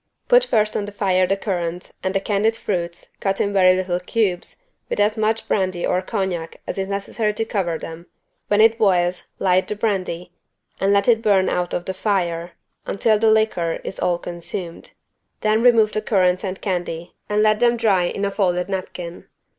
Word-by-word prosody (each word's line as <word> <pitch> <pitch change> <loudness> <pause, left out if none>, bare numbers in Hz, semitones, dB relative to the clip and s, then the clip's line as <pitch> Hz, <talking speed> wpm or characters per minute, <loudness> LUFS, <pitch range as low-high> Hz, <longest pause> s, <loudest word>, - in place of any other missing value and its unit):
Put - - +6
first 215 - +1
on 205 - -1
the 205 - -7
fire 185 -2 +2
the 195 +1 +1
currants 180 -3 -3
and 190 +1 -2
the - - +3
candied 215 +3 0
fruits 175 -5 -4
cut 195 -1 -1
in 200 - 0
very 185 -2 +5
little 185 -1 -1
cubes 185 - -2 0.3
with - - -2
as 210 +1 +3
much 220 0 0
brandy 185 -3 0
or 180 - +1
cognac 185 -5 -3
as - - -4
is 190 - -2
necessary 205 +2 -2
to 225 - -1
cover 180 -7 -1
them: 165 +2 -9 0.4
when 205 +1 +3
it 225 +1 +5
boils, 180 -3 +2
light 185 -1 +2
the 210 - -2
brandy 185 -5 -2 0.5
and 195 +1 +2
let 200 0 +3
it 225 -2 +4
burn 200 -4 +3
out 180 0 -1
of 175 - -3
the 190 - -3
fire 175 -4 -1 0.3
until 215 +2 +2
the 220 0 +4
liquor 215 -7 +1
is - - -6
all 175 -1 +1
consumed: 170 0 -6 0.5
then 215 +1 +2
remove 230 -3 +5
the 215 - -1
currants 185 -3 +2
and 190 -1 -4
candy 175 -3 -3 0.2
and 210 0 +2
let 215 0 +3
them 240 0 +3
dry 200 -6 +3
in 200 +3 -2
a 200 - -1
folded 180 -2 0
napkin. 180 -2 -5
195 Hz, 190 wpm, -21 LUFS, 180-215 Hz, 0.5 s, Put